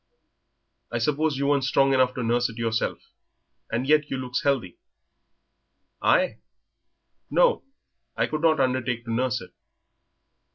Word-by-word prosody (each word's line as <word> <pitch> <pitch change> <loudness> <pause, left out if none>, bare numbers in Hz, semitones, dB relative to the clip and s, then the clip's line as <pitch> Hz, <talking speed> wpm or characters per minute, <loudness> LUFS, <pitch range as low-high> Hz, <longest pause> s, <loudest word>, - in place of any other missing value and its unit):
I 120 - -1
suppose 150 +4 0
you 140 - -1
weren't 140 -1 +2
strong 135 +1 +3
enough 130 -1 +2
to 125 - -3
nurse 120 +2 +1
it 115 - -11
yourself, 115 -1 -2 0.6
and 120 +3 -1
yet 150 0 +3
you 135 - -2
looks 125 -1 -3
healthy." 140 - -1 1.2
"I? - - +2 0.9
No, - - +3 0.5
I - - +2
could 155 0 -4
not 160 -2 +3
undertake 130 -2 0
to 115 - -3
nurse 125 +1 0
it." - - -12
130 Hz, 135 wpm, -25 LUFS, 120-145 Hz, 1.2 s, strong